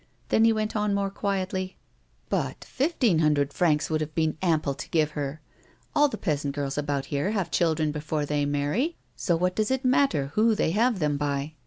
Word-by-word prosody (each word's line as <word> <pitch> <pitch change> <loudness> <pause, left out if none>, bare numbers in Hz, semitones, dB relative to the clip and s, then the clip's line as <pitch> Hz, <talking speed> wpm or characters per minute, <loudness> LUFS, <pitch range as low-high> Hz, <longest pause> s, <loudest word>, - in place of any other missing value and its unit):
Then 225 - +4
he 225 - +6
went 215 0 -1
on 210 -1 +1
more 200 -1 -1
quietly: 190 -2 -2 0.5
"But - - -2
fifteen 255 - +1
hundred 145 -2 +2
francs 155 -4 +2
would 155 0 +1
have 155 0 -4
been 160 -1 +1
ample 155 -6 +1
to - - -8
give 155 -2 +2
her. 145 0 -4 0.5
All 295 0 +5
the 275 - -5
peasant 145 -5 -2
girls 140 -2 -2
about 145 -2 -1
here 145 +6 0
have 195 -5 -1
children 160 -3 +1
before 150 0 -2
they 145 0 0
marry, 145 - 0 0.2
so 175 - 0
what 180 +2 0
does 215 -1 +1
it 265 0 -1
matter 250 - +2
who 220 +1 +3
they 160 - +1
have 230 +4 +2
them 150 -4 0
by 145 +1 -2
160 Hz, 195 wpm, -26 LUFS, 145-210 Hz, 0.5 s, he